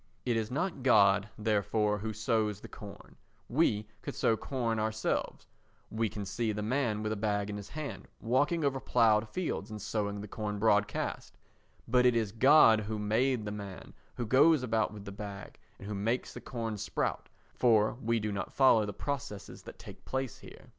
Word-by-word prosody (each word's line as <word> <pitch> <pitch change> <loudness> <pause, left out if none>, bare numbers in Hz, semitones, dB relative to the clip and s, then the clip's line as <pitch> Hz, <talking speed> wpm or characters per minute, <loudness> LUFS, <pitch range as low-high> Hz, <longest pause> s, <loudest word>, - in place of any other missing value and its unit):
It 120 - +1
is 110 -1 -1
not 165 +4 -2
God, 100 -5 +4
therefore, 105 0 +1
who 110 +2 -3
sows 110 -1 0
the - - -10
corn—we 105 +2 -3
could - - -6
sow 115 - +2
corn 115 -1 -2
ourselves, 110 0 -2 0.5
we 110 0 0
can 105 0 -6
see 110 +3 -1
the 105 0 -3
man 115 -2 0
with 110 - -1
a - - 0
bag 105 -1 -1
in 105 - -4
his 100 - -9
hand 155 -2 -6
walking 145 +7 +1
over 135 -1 0
ploughed 110 -4 +3
fields 180 -1 -3
and 105 0 -6
sowing 100 0 -2
the 105 - -7
corn 105 0 -4
broadcast—but 105 +3 -1
it 125 -1 +4
is 110 -3 0
God 115 -1 +6
who 110 +1 -4
made 110 +3 +1
the 105 - -3
man 100 -3 -8 0.2
who 120 - -3
goes 140 +5 +5
about 110 -3 0
with 105 -1 -10
the 100 - -6
bag, 100 -1 -8 0.2
and 100 - -10
who 105 - -4
makes 110 +5 -1
the - - -8
corn 115 -4 -4
sprout, - - -2 0.2
for 110 -3 +3
we 115 +1 +1
do 105 0 -2
not 100 -2 -4
follow 115 -6 +5
the 105 - -4
processes 120 -6 -5
that - - -11
take - - -12
place 130 -2 -3
here. - - -14
110 Hz, 180 wpm, -31 LUFS, 105-125 Hz, 0.5 s, God